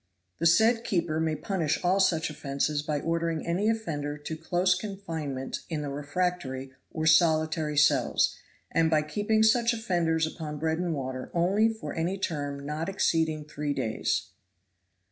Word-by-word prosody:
The 165 - +4
said 225 +7 +4
keeper 170 -7 0
may 160 -1 0
punish 160 -1 -1
all 185 +2 +3
such 165 -4 +2
offenses 145 0 -1
by 150 -1 -2
ordering 165 -1 -1
any 185 +6 +1
offender 150 -10 -2
to 150 +2 -6
close 175 +3 +1
confinement 165 -9 -4
in 155 -3 -2
the 145 - -3
refractory 145 -2 -2 0.2
or 160 -1 -3
solitary 155 -1 +3
cells, 150 +1 +3 0.4
and 165 -1 +3
by 155 -1 +3
keeping 210 +7 +1
such 235 +2 +4
offenders 170 -7 +1
upon 155 -2 -5
bread 160 +2 -1
and 175 -2 -1
water 130 -2 -5
only 195 +6 +3
for 220 0 -6
any 175 +4 -1
term 145 -6 -3
not 155 +4 -3
exceeding 160 -5 +1
three 150 -1 -3
days.'" 110 -1 -1
160 Hz, 150 wpm, -28 LUFS, 150-180 Hz, 0.4 s, The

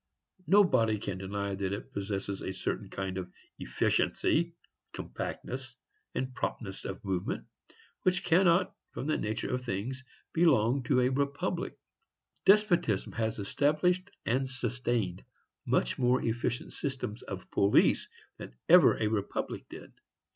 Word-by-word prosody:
Nobody 130 - +5
can 100 -2 -4
deny 100 +1 -3
that 95 0 -2
it 120 +6 -7
possesses 100 -1 -3
a 95 - -4
certain - - -3
kind 95 -1 -3
of 90 -1 -7 0.3
efficiency, 170 +1 +1 0.4
compactness, 130 -1 -5 0.4
and 130 0 -2
promptness 100 -5 -4
of 95 +3 -6
movement, 95 -2 -2 0.6
which 185 -1 +1
cannot, 175 +1 +4 0.2
from - - -4
the 155 - +1
nature 110 +3 -2
of 125 0 -1
things, 125 +5 -3 0.3
belong 140 -6 +4
to 125 -2 +3
a 125 - +3
republic. 140 +7 -1 0.7
Despotism 180 - +4
has 110 -1 -1
established 155 - +1 0.2
and 130 +2 +1
sustained 120 -7 -1 0.4
much - - +1
more 125 0 +3
efficient 120 +1 -1
systems 130 -5 -3
of 95 -2 -8
police 100 0 +4 0.3
than - - -9
ever - - +8
a - - 0
republic 105 -2 -2
did. - - -11
120 Hz, 125 wpm, -30 LUFS, 100-140 Hz, 0.7 s, ever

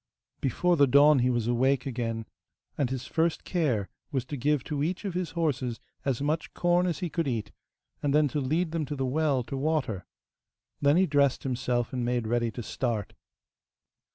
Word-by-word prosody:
Before 175 +6 +1
the 140 -1 +6
dawn 140 +2 +6
he 125 +1 +3
was 120 -3 0
awake 130 +3 +2
again, 115 -3 -3 0.5
and 135 -4 0
his 130 -1 -4
first 165 0 0
care 130 - 0 0.2
was 130 -3 -1
to 145 - -5
give 145 +1 +1
to 145 -2 -3
each 180 +7 -2
of 195 - -2
his 180 -1 -2
horses 130 -8 0 0.2
as 135 -1 -1
much 155 +2 -1
corn 175 +1 +2
as 175 +2 -2
he - - -2
could 165 -4 -1
eat, 115 -5 -2 0.5
and 145 - +1
then 150 +1 +4
to 145 +2 -1
lead 160 +6 0
them 165 -1 -1
to 145 - -4
the 135 -1 -1
well 140 -1 +1
to 135 - -6
water. 135 - -1 0.7
Then 145 +3 +4
he 190 - +5
dressed 140 -4 +2
himself 125 -2 -1
and 125 -1 -1
made 120 -1 0
ready 120 +1 +1
to 120 +1 -6
start. 115 -3 -2
140 Hz, 190 wpm, -28 LUFS, 120-155 Hz, 0.7 s, the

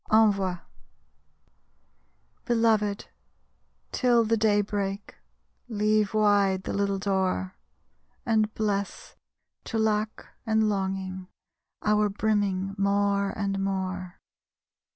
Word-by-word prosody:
ENVOI 200 -5 +3 1.9
_Belovèd, 220 -3 +2 0.9
till 240 -2 +3
the 225 +1 +2
day 210 -2 +3
break, 200 0 -3 0.5
Leave 215 -2 +1
wide 200 -3 +3
the - - -4
little 200 -1 0
door; 190 -1 -1 0.7
And 220 -2 +2
bless, 200 -2 -3 0.5
to 225 - -3
lack 215 0 0 0.2
and 220 -1 +2
longing, 190 -2 -3 0.6
Our 210 0 +3
brimming 200 -2 0
more 200 0 +2
and 195 -1 -1
more. 190 -1 -3
205 Hz, 90 wpm, -27 LUFS, 195-215 Hz, 1.9 s, ENVOI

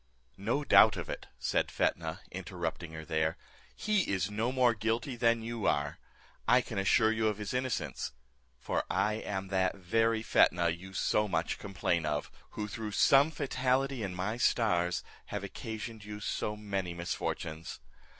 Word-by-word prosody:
"No 120 +9 0
doubt - - +7
of - - -5
it," - - -6
said - - 0
Fetnah, 80 +1 -1
interrupting 85 -2 -4
her 80 0 -7
there, 80 0 0 0.4
"he 210 - +1
is 95 0 0
no 110 +4 0
more 125 -2 +4
guilty 115 +4 -1
than 115 -1 +2
you 115 -2 -2
are; 70 0 0 0.5
I 125 - +6
can 110 -4 -4
assure 105 +3 +4
you 110 0 +1
of 105 -2 0
his 105 +1 -4
innocence; 130 -1 -2 0.5
for - - -1
I 105 - +2
am 95 -3 -4
that 95 -1 +1
very 115 +4 +1
Fetnah, 85 -5 +4
you 90 +4 -6
so 105 +2 +2
much 85 -3 -1
complain 90 -5 -1
of; 75 -1 -2 0.3
who, 105 - -2
through 105 0 -5
some 140 +8 +6
fatality 135 -3 0
in 95 -3 -3
my 100 +5 -2
stars, 90 -9 +2 0.2
have - - -4
occasioned 110 -1 -6
you 105 0 -7
so 105 +1 -2
many 100 -4 -3
misfortunes. 80 -2 -4
105 Hz, 160 wpm, -31 LUFS, 90-115 Hz, 0.5 s, doubt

